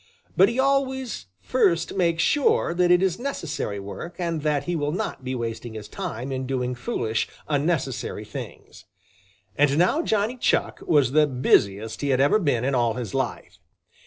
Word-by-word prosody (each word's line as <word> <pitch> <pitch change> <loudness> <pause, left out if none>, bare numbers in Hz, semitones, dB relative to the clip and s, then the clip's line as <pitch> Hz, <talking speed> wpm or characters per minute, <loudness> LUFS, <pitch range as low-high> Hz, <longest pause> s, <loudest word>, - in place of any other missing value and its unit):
But 195 +2 +6
he 235 - -4
always 265 - 0
first 185 -10 +1
makes 170 -3 +1
sure 290 - +2
that 175 0 +2
it 180 +1 +5
is 185 0 0
necessary 165 - -3
work 100 - -7
and 170 -3 -2
that 150 -2 0
he 175 +4 -2
will 145 -2 -1
not 185 -5 -4
be 130 0 -3
wasting 115 -1 -5
his 105 -1 -7
time 125 +5 -5
in 130 -1 -3
doing 125 -1 -1
foolish, 120 - -2 0.2
unnecessary 145 -3 -1
things. - - -9 0.7
And 145 0 +3
now 185 - +3
Johnny 220 -3 0
Chuck - - 0
was 145 -7 +4
the 150 +1 +4
busiest 110 -5 +1
he 145 - -1
had 130 -1 +2
ever 145 +10 +4
been 135 - +1
in 135 - 0
all 120 -3 +2
his 120 -6 -5
life. 130 -2 -3
145 Hz, 170 wpm, -24 LUFS, 125-180 Hz, 0.7 s, But